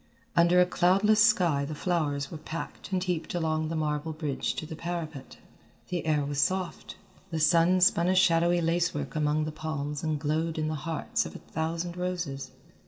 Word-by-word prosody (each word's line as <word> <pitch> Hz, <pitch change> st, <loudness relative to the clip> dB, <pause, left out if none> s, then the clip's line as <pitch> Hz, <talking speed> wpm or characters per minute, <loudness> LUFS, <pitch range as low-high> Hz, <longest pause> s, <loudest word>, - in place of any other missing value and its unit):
Under 170 Hz, +1 st, +5 dB
a 180 Hz, -, +6 dB
cloudless 195 Hz, +5 st, +4 dB
sky 175 Hz, -10 st, +3 dB
the 150 Hz, +2 st, -4 dB
flowers 150 Hz, -5 st, -1 dB
were 160 Hz, -, -6 dB
packed 160 Hz, +5 st, -7 dB
and 185 Hz, -1 st, 0 dB
heaped 180 Hz, +1 st, -2 dB
along 160 Hz, -2 st, 0 dB
the 165 Hz, -, -3 dB
marble 155 Hz, 0 st, -1 dB
bridge 150 Hz, -3 st, -2 dB
to -, -, -4 dB
the 160 Hz, -, -7 dB
parapet. 160 Hz, -5 st, -6 dB, 0.5 s
The 175 Hz, -3 st, -3 dB
air 150 Hz, -2 st, +2 dB
was 140 Hz, 0 st, -1 dB
soft, 185 Hz, +3 st, -2 dB, 0.3 s
the 165 Hz, -3 st, -2 dB
sun 170 Hz, +3 st, +4 dB
spun 175 Hz, -1 st, +4 dB
a 185 Hz, -, +3 dB
shadowy 175 Hz, -1 st, +4 dB
lacework 165 Hz, -4 st, -1 dB
among 155 Hz, 0 st, +1 dB
the 155 Hz, -, -3 dB
palms 155 Hz, -2 st, -4 dB
and 155 Hz, -2 st, -1 dB
glowed 160 Hz, +2 st, -1 dB
in 155 Hz, 0 st, -1 dB
the -, -, -2 dB, 0.2 s
hearts 160 Hz, -, -1 dB
of -, -, -11 dB
a -, -, -4 dB
thousand 165 Hz, +2 st, -4 dB
roses. 175 Hz, -7 st, -3 dB
160 Hz, 180 wpm, -28 LUFS, 155-175 Hz, 0.5 s, a